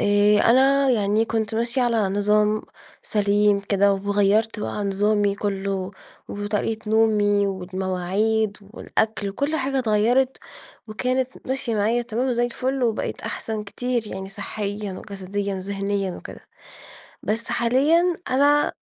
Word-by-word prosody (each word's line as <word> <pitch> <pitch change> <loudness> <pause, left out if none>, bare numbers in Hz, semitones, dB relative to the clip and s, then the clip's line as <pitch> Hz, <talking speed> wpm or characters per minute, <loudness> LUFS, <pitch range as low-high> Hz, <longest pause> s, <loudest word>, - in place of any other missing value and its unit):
آآ، 205 +1 +4
أنا 270 +4 +4
يعني 215 -1 +2
كنت 220 -1 -2
ماشية 235 +3 0
على 235 -2 +2
نظام 210 +2 +2 0.4
سليم 205 -1 +2
كده، 200 0 +2
وغيّرت 205 +2 +1
بقى 210 0 -3
نظامي 205 +1 +1
كلّه، 195 -2 -3 0.4
وطريقة 210 +1 -3
نومي، 210 -2 +3
والمواعيد، 190 +3 -1 0.2
والأكل، 220 -3 -1
وكل 285 +10 -1
حاجة 270 -2 -1
اتغيّرت، 245 +3 +2 0.5
وكانت 255 +4 -1 0.2
ماشية 260 -3 -2
معايا 220 +3 +1
تمام 240 +3 -2
وزي 240 -1 +1
الفل، 255 +2 -2
وبقيت 230 -3 -1
أحسن 220 -1 -4
كتير، 240 +2 -2
يعني 190 -1 -6
صحّيًا 205 0 -5
وجسديًا 200 +1 -4
وذهنيًا 195 0 -2
وكده. - - -10 0.8
بس 225 +2 -2
حاليًا 310 +9 +2
أنا 285 +3 +3
210 Hz, 120 wpm, -23 LUFS, 200-240 Hz, 0.8 s, آآ